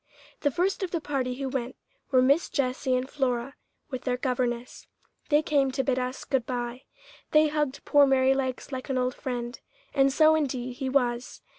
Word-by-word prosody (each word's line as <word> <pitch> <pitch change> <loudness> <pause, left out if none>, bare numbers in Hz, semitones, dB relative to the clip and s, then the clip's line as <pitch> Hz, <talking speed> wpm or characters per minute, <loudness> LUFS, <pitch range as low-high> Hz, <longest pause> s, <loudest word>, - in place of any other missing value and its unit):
The 290 - +2
first 365 +9 0
of 380 - -1
the 335 - -1
party 265 -5 -2
who 270 +1 -3
went 260 -1 -3 0.3
were 255 -2 +4
Miss 280 +6 +3
Jessie 260 -2 0
and 255 +1 -1
Flora 265 -2 -1 0.4
with 255 -2 -4
their 250 -1 -1
governess. 250 -2 -2 0.4
They 295 +1 +4
came 280 -3 +2
to 265 0 0
bid 260 -1 +1
us 255 +1 -4
good 260 -4 0
bye. 245 0 -4 0.5
They 305 0 +6
hugged 295 -3 -2
poor 290 -1 +6
Merrylegs 265 0 +1
like 260 +1 -5
an 265 - 0
old 250 0 0
friend, 245 -3 -5 0.3
and 275 -1 +4
so 310 +3 +5
indeed 255 -5 -1
he 265 0 -2
was. 245 -2 0
260 Hz, 180 wpm, -27 LUFS, 250-280 Hz, 0.5 s, They